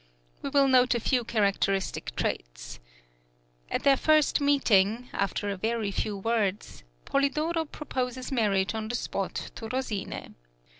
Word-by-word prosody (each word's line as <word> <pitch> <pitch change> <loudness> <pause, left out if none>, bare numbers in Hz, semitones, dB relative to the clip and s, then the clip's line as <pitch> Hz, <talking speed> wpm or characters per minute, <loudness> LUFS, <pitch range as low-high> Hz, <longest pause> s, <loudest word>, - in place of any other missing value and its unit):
We - - -3
will 275 0 +4
note 255 -1 +4
a - - +1
few 245 +2 +1
characteristic 200 -3 0
traits. - - -4 0.9
At - - -2
their 275 -1 +6
first 310 0 +3
meeting, 245 -5 +3
after 200 +1 -1
a - - -2
very 220 0 -1
few 205 +1 -2
words, 210 -1 -1 0.2
Polidoro 305 +4 0
proposes 255 -4 -4
marriage 205 -6 +1
on 220 -1 -3
the 240 - -3
spot 195 -4 -3
to 225 - -7
Rosine. 245 -6 -4
235 Hz, 135 wpm, -28 LUFS, 200-270 Hz, 0.9 s, their